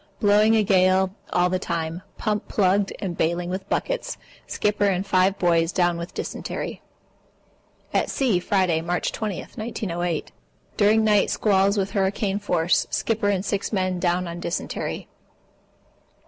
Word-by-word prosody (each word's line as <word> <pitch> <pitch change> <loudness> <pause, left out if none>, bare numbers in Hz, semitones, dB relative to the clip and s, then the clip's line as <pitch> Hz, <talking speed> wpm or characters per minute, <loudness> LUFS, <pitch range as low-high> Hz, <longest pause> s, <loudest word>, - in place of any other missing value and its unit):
Blowing 210 +1 +4
a 220 - +4
gale 185 -1 +3 0.2
all 180 0 +3
the 185 0 -1
time. 165 -1 -3 0.2
Pump 210 -2 -2
plugged 195 0 +2
up - - -8
and 185 -4 -3
bailing 175 +2 -1
with 190 +1 -5
buckets. - - -2 0.3
Skipper 205 -1 +1
and 190 0 0
five 190 0 +2
boys 170 -1 +2
down 175 -2 +1
on 170 - -4
dysentery. - - -5 1.1
At - - +1
sea, 240 -10 +1
Friday, 180 -3 +1
March 175 +2 -1
20, 210 -4 -3
1908. 175 -7 -4 0.4
During 215 +1 +4
night 210 -2 +3
squalls 200 -1 +2
with 195 0 0
hurricane 195 0 0
force. 175 -4 +1
Skipper 220 -2 0
and 195 -1 0
six 200 0 -2
men 185 -3 0
down 175 0 0
on 170 0 -6
dysentery. 175 - -4
190 Hz, 145 wpm, -24 LUFS, 175-205 Hz, 1.1 s, Blowing